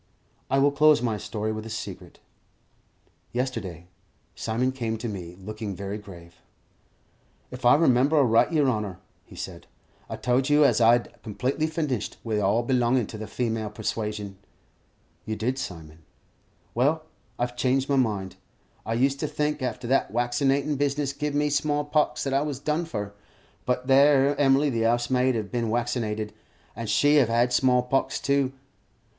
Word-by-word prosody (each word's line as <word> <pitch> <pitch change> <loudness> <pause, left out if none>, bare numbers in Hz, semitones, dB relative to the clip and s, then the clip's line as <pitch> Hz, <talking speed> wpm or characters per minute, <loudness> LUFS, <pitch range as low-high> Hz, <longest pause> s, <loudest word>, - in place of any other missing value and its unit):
I 135 - +2
will 140 +1 +4
close 150 0 +5
my 115 -3 -1
story 110 +1 -3
with 110 0 -5
a 115 - -8
secret. 110 - -7 1.2
Yesterday, 115 -10 -3 0.5
Simon 120 +4 -1
came 115 -4 -3
to 120 +2 -5
me, 90 -5 -6
looking 105 0 -6
very 100 +2 -5
grave. 85 -4 -13 1.1
"If 125 0 -7
I 120 - +7
remember 140 -1 +3
aright, 120 -2 +4
yer 155 -3 +3
honour," 105 -7 -1 0.3
he - - -15
said, - - -8 0.4
"I - - -4
told 130 +2 0
you 145 0 +5
as 120 -4 +3
'ow 115 - +6
I'd 120 -1 +1
completely 130 +8 -2
finished 150 - -3
wi' 110 -2 -1
all 105 +4 +2
belongin' 125 -1 +2
to 110 - -7
the 110 - -6
female 110 -1 -2
persuasion." 105 -2 -4 0.8
"You 110 - -3
did, 125 +5 -2
Simon." 80 -6 -7 0.7
"Well, 145 +6 +1 0.3
I've 120 0 -2
changed 130 +2 +1
my 140 - +1
mind. 105 -7 -1 0.5
I 115 - 0
used 135 +3 +1
to 155 - -1
think 150 0 -2
after 125 -1 -3
that 130 +3 +1
waccinatin' 135 +4 +1
business 140 -1 0
gived 145 +1 -3
me 150 0 +1
small 145 +1 0
pox, 150 0 +1
that 135 - -2
I 135 - +3
was 145 -2 -3
done 155 +4 -1
for; 105 -9 -5 0.5
but 125 0 0
that 135 +2 +6
'ere 140 0 +4
Emily 140 +1 +4
the 115 -2 -1
'ousemaid 120 +2 +2
'ev 105 -3 -3
bin 120 -2 -1
waccinated, 110 -2 -2 0.4
and 115 +1 -5
she 145 +1 +4
'ev 130 - +4
had 120 +2 +2
small 125 -1 +3
pox 135 +2 0
too. 140 -2 +1
125 Hz, 165 wpm, -26 LUFS, 110-140 Hz, 1.2 s, I